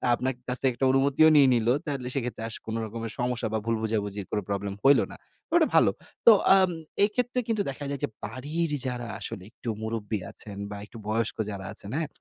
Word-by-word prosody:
আপনার 130 +2 -1
কাছে 125 +1 -1
একটা 120 +2 -5
অনুমতি 135 +2 +2
নিয়ে 140 -2 +7
নিলো। 120 0 +3
তাহলে 140 -5 -3
সেক্ষেত্রে 125 -4 -3
আস 115 - -4
কোনো 110 0 -3
রকমের 115 +1 -5
সমস্যা 125 -1 0
বা, - - +2
ভুল 115 0 +1
বোঝাবুঝির 105 -3 -2
কোনো 105 - 0
প্রবলেম 100 0 -2
হইলো 135 -5 +6
না। - - -9 0.4
ওটা - - +6
ভালো। - - +6 0.4
তো 235 - +11 0.2
অ্যাম 190 -1 +6 0.4
এক্ষেত্রে 245 +4 0
কিন্তু 220 -3 +1
দেখা 135 +2 -6
যায় 140 -1 -3
যে - - +2 0.2
বাড়ির 145 +9 -2
যারা 125 -2 -3
আসলে 100 -2 -5
একটু 120 - -7
মুরুব্বি 110 -1 -2
আছেন, 100 -2 -10
বা 105 - -6
একটু 110 - -13
বয়স্ক 115 +1 0
যারা 100 -2 -6
আছেন। 100 - -7
হ্যাঁ? 160 -1 -1
120 Hz, 195 wpm, -27 LUFS, 110-140 Hz, 0.4 s, তো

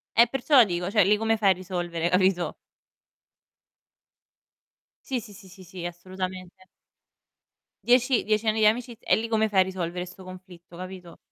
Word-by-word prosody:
Eh 235 +1 +6
perciò 270 0 +4
dico 175 -1 -3
cioè 210 -3 +4
lì 210 +1 +3
come 225 0 0
fai 200 -2 +3
a - - +4
risolvere, 175 -2 -3
capito? 185 -1 +1 2.5
Sì, 260 -2 -2
sì, 210 -2 -12
sì, 190 -1 -15
sì, 190 0 -14
sì, 175 -1 -8
assolutamente. 185 +1 -7 1.2
Dieci 245 0 +3
dieci 215 +1 0
anni 220 +1 +1
di 215 - +5
amiciz 235 +2 +1
e - - +2
lì 225 - -3
come 220 -1 +1
fai 195 - +2
a 185 - +7
risolvere 180 -1 -4
'sto 180 +1 -13
conflitto, 180 -2 -13
capito? 185 -1 -9
190 Hz, 160 wpm, -25 LUFS, 180-220 Hz, 2.5 s, a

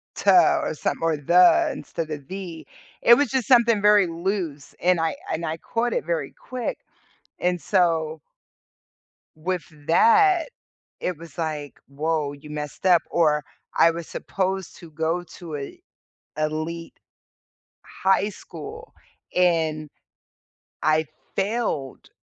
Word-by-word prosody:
ta 350 -2 +5
or 305 - -2
something - - -2
or, 165 -1 +2
"the," 180 - +5
instead 165 - -5
of, 145 -2 -6
"the." 185 -4 -7 0.3
It 235 - +8
was 290 +2 +1
just 265 -2 -1
something 235 -5 +5
very 210 -2 +5
loose, 170 -4 -3
and 180 -1 +3
I 165 0 +1 0.2
I - - 0
and 165 +1 -4
I 160 0 -2
caught 230 +8 -2
it - - -1
very - - -2
quick, 255 -2 -5 0.6
and 180 -1 0
so 160 -5 +1 1.1
with 180 +3 -3 0.2
that, 390 - +5 0.5
it 180 -3 -2
was 165 0 -13
like, 150 -4 -4
"Woah, 150 -1 -2
you 150 - -12
messed 150 +3 -6
up." 175 -3 +6
Or 150 -3 +3 0.3
I 165 - +6
was 170 0 -6
supposed 190 -1 -3
to 170 - -12
go 160 +3 -1
to 165 -4 -7
a 140 - -8 0.6
elite 155 +2 -3 0.9
high 195 +1 +1
school, 445 - -10 0.4
and 160 -4 +2 0.9
I 155 0 +2 0.3
failed 195 - -2
170 Hz, 130 wpm, -24 LUFS, 155-205 Hz, 1.1 s, It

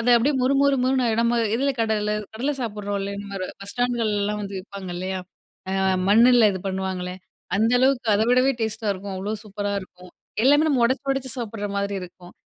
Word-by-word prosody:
அது 240 +2 +2
அப்டியே 270 +5 +2
மொறு 265 +2 +3
மொறு 280 -1 +3
மொறுன்னு 260 -1 +2
ஆயிடும். 225 +1 +2
நம்ம 235 0 +2 0.2
எதுல 275 +3 +1
கடல 210 -1 0 0.2
கடல 270 +6 -1
சாப்டுறோம் 205 -3 -3
இல்லையா? 200 +1 -4
இந்த 205 - -9
மாரி, 185 -2 -4
பஸ் 200 - -7
ஸ்டாண்டுகள்லல்லாம் 215 -4 0
வந்து 195 -1 -5
விப்பாங்க 190 -1 -8
இல்லையா? 185 +1 -3 0.5
அ - - -2 0.4
மண்ணுல 230 +2 +6
இது 190 - -4
பண்ணுவாங்களே! 190 -1 -3 0.4
அந்த 225 +3 +2
அளவுக்கு 260 -2 +2
அதவிடவே 250 +5 +3
டேஸ்டா 220 0 -2
இருக்கும். 195 +1 -6
அவ்ளோ 195 +3 -3
சூப்பரா 205 -1 -3
இருக்கும். 180 -1 -14 0.3
எல்லாமே 290 +4 +5
நம்ம 280 -5 +2
ஒடச்சு 260 +3 0
ஒடச்சு 270 -1 -2
சாப்டுற 225 -3 -4
மாரி 200 0 -1
இருக்கும். 180 0 -11
215 Hz, 185 wpm, -24 LUFS, 200-245 Hz, 0.5 s, மண்ணுல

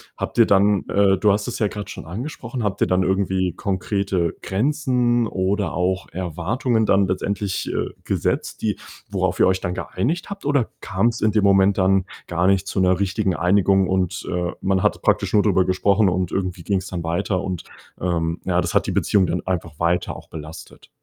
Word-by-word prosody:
habt - - -5
ihr 115 - +7
dann 100 0 +3
äh, 100 -1 +3
du 105 0 +3
hast 105 +3 -2
es 120 - -5
ja 105 - +2
grad 105 0 -6
schon - - -8
angesprochen, 120 - -5
habt 100 -1 -2
ihr - - +3
dann 90 0 +2
irgendwie 95 -1 0
konkrete 95 -3 -1
Grenzen 120 0 +1
oder 95 -1 -1
auch 95 +2 -1
Erwartungen 100 - -1
dann 100 -1 +3
letztendlich, 100 +1 -2
äh, - - -2 0.2
gesetzt, - - -1
die 105 -3 -1 0.3
worauf - - 0
ihr - - +6
euch 95 0 +2
dann 90 - -3
geeinigt 150 - -2
habt 200 -6 -8
oder 140 -5 +1
kam's 115 +4 0
in 110 -1 +1
dem 105 -2 +2
Moment 100 0 +4
dann 95 0 +3 0.2
gar 85 +2 +1
nicht 95 0 +3
zu 95 - -2
'ner 90 -1 +3
richtigen 95 -1 0
Einigung 95 +1 +3
und, 95 -1 -1
äh, 90 0 -1
man 95 -1 +1
hat - - +1
praktisch - - +1
nur 105 - +5
drüber 95 -3 +3
gesprochen 100 +2 +2
und 90 -1 0
irgendwie 90 -3 -3
ging's 95 -2 -1
dann 90 -3 -5
weiter 85 +3 -1
und, 90 -3 -4 0.3
ähm, 85 -2 -1
ja, 90 -1 +2
das - - -3
hat - - +2
die - - 0
Beziehung 95 -4 +2
dann 90 - -2
einfach 85 -4 -3
weiter 85 +1 0
auch - - -12
belastet? 80 0 -10
95 Hz, 195 wpm, -22 LUFS, 90-105 Hz, 0.3 s, ihr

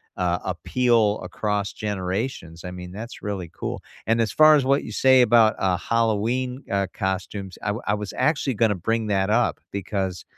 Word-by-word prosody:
uh, 90 -1 0
appeal 110 +3 +1
across 105 -1 -2
generations. 95 -3 -4
I 90 - -6
mean, 90 0 -8
that's 115 +4 -8
really 95 -5 -4
cool. - - -5 0.3
And 115 +1 +3
as 110 - 0
far 155 0 +7
as 145 - +3
what 140 +2 +2
you - - -7
say 130 +2 +5
about, 115 -2 +5
uh, 95 -1 +2
Halloween, 115 +4 0
uh, 100 -1 +1
costumes, 95 -1 -4
I 100 - -1
wa 110 - -5
I 105 - +2
was 105 -1 -6
actually 145 -4 +1
gonna 110 -1 +2
bring 110 +5 -1
that 100 -1 +1
up 115 +3 +2
because, 95 -2 -3
105 Hz, 180 wpm, -24 LUFS, 95-115 Hz, 0.3 s, far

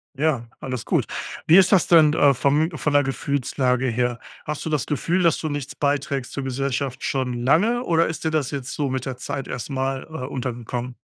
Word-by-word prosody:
Ja, 140 -4 0
alles 130 -3 -5
gut. - - +1 0.4
Wie 165 +4 +8
ist 190 +1 +6
das 190 -4 +4
denn, 160 -3 +6
äh, 140 -4 +4
vom 145 +6 +2
von 150 - -1
der 145 - +6
Gefühlslage 130 -1 0
her? 120 0 0 0.3
Hast 150 0 -4
du 160 - -3
das 150 -5 0
Gefühl, 170 +6 0
dass 165 -2 +3
du 155 - -3
nichts 145 0 -4
beiträgst 140 -2 -1
zur 140 - -3
Gesellschaft 135 0 -2
schon 130 -3 -1
lange 210 - +3
oder 165 -4 +3
ist 160 0 -4
dir 160 - +1
das 155 -4 -1
jetzt 140 -1 -5
so 145 -2 -1
mit 130 -1 -3
der 130 -2 -4
Zeit 135 +1 -5
erst 125 +3 -5
mal, 135 0 -2
äh, 155 -5 -6
untergekommen? 120 -1 -4
140 Hz, 205 wpm, -23 LUFS, 130-155 Hz, 0.4 s, Wie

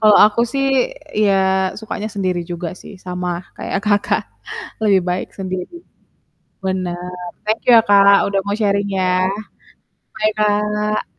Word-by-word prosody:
Kalau 215 -2 +6
aku 215 +2 0
sih 275 -1 0 0.5
ya 210 -2 +3 0.5
sukanya 215 0 -5
sendiri 185 -3 -1
juga 175 0 -3
sih - - -11
sama 180 0 -4 0.3
kayak, - - -2
Kakak, 205 -1 +2 0.6
lebih 200 -3 +4
baik 180 +1 -2
sendiri 185 - -4 0.9
bener, 180 -1 -3 0.3
thank 215 +1 -1
you 245 - +6
ya, 225 - +7
Kak, 200 0 +6
udah 200 -1 +1
mau 200 0 -1
sharing 200 -1 +1
ya, 185 -1 +1 0.9
bye, 215 0 +1
Kak. 210 0 0
200 Hz, 135 wpm, -19 LUFS, 185-210 Hz, 0.9 s, ya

